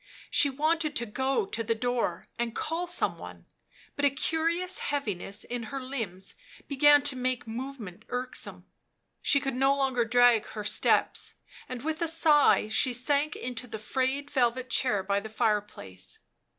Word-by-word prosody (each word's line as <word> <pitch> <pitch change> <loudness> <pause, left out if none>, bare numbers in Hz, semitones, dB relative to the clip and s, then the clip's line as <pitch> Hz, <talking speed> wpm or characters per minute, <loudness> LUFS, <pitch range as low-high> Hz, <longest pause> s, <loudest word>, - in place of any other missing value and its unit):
She 285 - +4
wanted 305 +2 0
to 240 - 0
go 260 +1 0
to 225 +4 -2
the 225 +1 0
door 235 -7 -1
and 235 -1 -2
call 335 +3 -1
some 350 - 0
one, - - -10 0.5
but 285 - -4
a 285 - +6
curious 330 +6 0
heaviness 205 -9 -3
in 240 -2 -5
her 275 -1 -4
limbs 225 -8 -5 0.3
began 290 +1 +5
to 285 -2 +1
make 255 0 -2
movement 230 -5 -7
irksome; 250 +1 -4 0.6
she 280 - +3
could 270 -1 -3
no 270 +2 +3
longer 265 -3 +1
drag 240 -1 +4
her 210 - -6
steps, 205 - +1 0.3
and 255 -1 -6
with 315 +1 -2
a 335 - +1
sigh 310 -7 +4
she 250 +4 +2
sank 285 +4 +1
into 250 -1 -5
the 220 - -6
frayed 265 +6 -2
velvet 255 0 +1
chair 210 -8 +2
by 200 +1 +1
the 220 +2 -8
fireplace. 210 - -2
255 Hz, 160 wpm, -28 LUFS, 225-285 Hz, 0.6 s, a